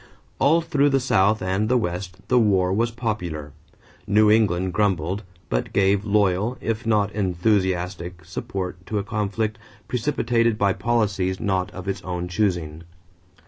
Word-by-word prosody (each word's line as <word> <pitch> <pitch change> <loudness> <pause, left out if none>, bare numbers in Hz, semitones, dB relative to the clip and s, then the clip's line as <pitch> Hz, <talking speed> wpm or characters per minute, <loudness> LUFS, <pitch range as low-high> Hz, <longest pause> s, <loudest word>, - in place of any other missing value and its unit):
All 160 +5 +4
through 145 -4 +2
the 135 -1 +2
South 105 -4 +2
and 95 +4 0
the 125 - +4
West 90 -1 -4
the 125 - +4
war 95 -4 +3
was 115 +4 +1
popular. 90 - -4 0.6
New 105 +1 +5
England 95 -5 +2
grumbled, 95 -2 0 0.3
but - - -2
gave 100 0 +3
loyal, 105 +3 +1
if 115 +1 -3
not 105 -2 +2
enthusiastic, 90 -3 -1
support 90 +1 -5
to 110 - -2
a 100 - 0
conflict 105 +1 -2 0.3
precipitated 115 -3 +1
by 100 -2 +2
policies 100 -6 0
not 95 -3 0
of 95 +1 -9
its 100 - -2
own 90 -1 -4
choosing. 85 -5 -1
100 Hz, 145 wpm, -23 LUFS, 90-110 Hz, 0.6 s, New